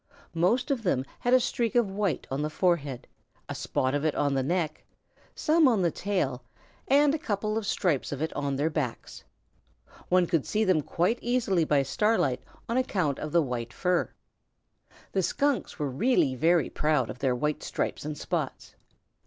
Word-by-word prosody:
Most 210 +11 +1
of 265 -4 0
them 135 - 0
had 245 - 0
a - - +6
streak 240 -1 -1
of 235 -5 +3
white 200 -2 -1
on 135 +2 -1
the 150 - -1
forehead, 150 -6 0 0.4
a - - -4
spot 130 +1 -1
of 145 0 0
it 155 -2 +1
on 145 -1 +1
the 135 - +1
neck, 155 +2 -1 0.5
some 315 -1 +4
on 225 -7 +3
the 170 - +2
tail, 145 -10 -1 0.5
and 285 +1 +4
a 315 - -1
couple 215 -4 -2
of 220 -2 -2
stripes 175 - 0
of 140 - -4
it 160 +1 -2
on 140 -1 -2
their 150 +4 0
backs. 140 -7 -4 0.9
One 180 -1 +4
could 165 -4 0
see 215 +1 +1
them 185 -6 +3
quite 180 - 0
easily 230 -9 +1
by 145 -2 +3
starlight 145 - +1 0.3
on 235 - -1
account 180 - 0
of 155 - -5
the 170 0 +4
white 120 -3 -4
fur. 180 -1 0 1.0
The 195 - +1
Skunks 280 +8 0
were 145 -3 -2
really 145 - +2
very 160 +3 +2
proud 150 -7 +1
of 125 - -11
their 130 -3 +1
white 150 +4 -1
stripes - - -3
and 150 0 -5
spots. - - -4
170 Hz, 180 wpm, -28 LUFS, 140-215 Hz, 1.0 s, a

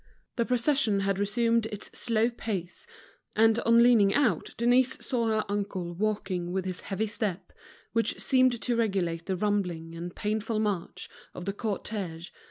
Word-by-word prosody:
The 235 - +1
procession 250 -4 +2
had 195 0 0
resumed 230 +2 +1
its 210 -2 -7
slow 230 0 +1
pace; 195 -7 -5 0.5
and 225 +1 +4
on 230 0 +5
leaning 220 -5 +5
out, 280 -6 +2
Denise 245 +2 +3
saw 235 -3 0
her 220 -1 +1
uncle 200 -4 -3
walking 190 -3 -2
with 190 0 -2
his 185 -1 -4
heavy 205 +2 -2
step, 205 -3 -4 0.4
which 230 0 +1
seemed 255 -3 +3
to 245 - +1
regulate 185 -7 -1
the 190 - 0
rumbling 180 -5 -1
and 170 +1 -7
painful 215 +1 -2
march 205 -5 -2 0.3
of 180 - -7
the 200 - -2
cortege. 195 -5 -4
210 Hz, 155 wpm, -28 LUFS, 190-230 Hz, 0.5 s, on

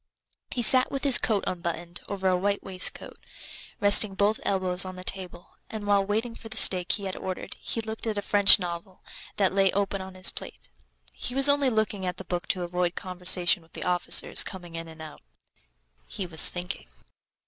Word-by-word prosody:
He 245 - -2
sat 255 +3 +6
with 275 - -6
his 275 -3 +7
coat 210 -3 -1
unbuttoned 175 -1 -6
over 190 -2 -4
a 185 - +1
white 200 +2 -3
waistcoat, 185 -1 -2 0.6
resting 205 0 +5
both 205 +2 -1
elbows 185 -2 +2
on 185 -1 -8
the 185 - -9
table, 180 -2 -9 0.2
and 215 -2 -8
while 200 -1 +1
waiting 220 +4 -4
for 225 0 -13
the - - -6
steak 180 -2 +4
he 205 - -4
had 190 -1 -6
ordered 185 -1 -8
he 230 - -4
looked 220 +1 -7
at 215 -2 -4
a 205 - -4
French 205 -1 +6
novel 175 0 -8 0.3
that 195 -2 0
lay 195 -1 +1
open 195 0 -3
on 190 0 -11
his 185 - +5
plate. - - -11 0.4
He 245 - -7
was 275 +1 +6
only 285 -1 +2
looking 215 -4 -3
at 180 0 -5
the 190 - -10
book 175 0 -6
to 180 - -3
avoid 175 0 -3
conversation 180 -1 +3
with 165 - -25
the - - -6
officers 180 -1 +3
coming 175 -3 -9
in 165 0 -8
and 160 -1 -12
out; 155 -2 -12 0.9
he 195 - -7
was 165 -3 -1
thinking. 180 +2 -8
190 Hz, 195 wpm, -24 LUFS, 180-205 Hz, 0.9 s, his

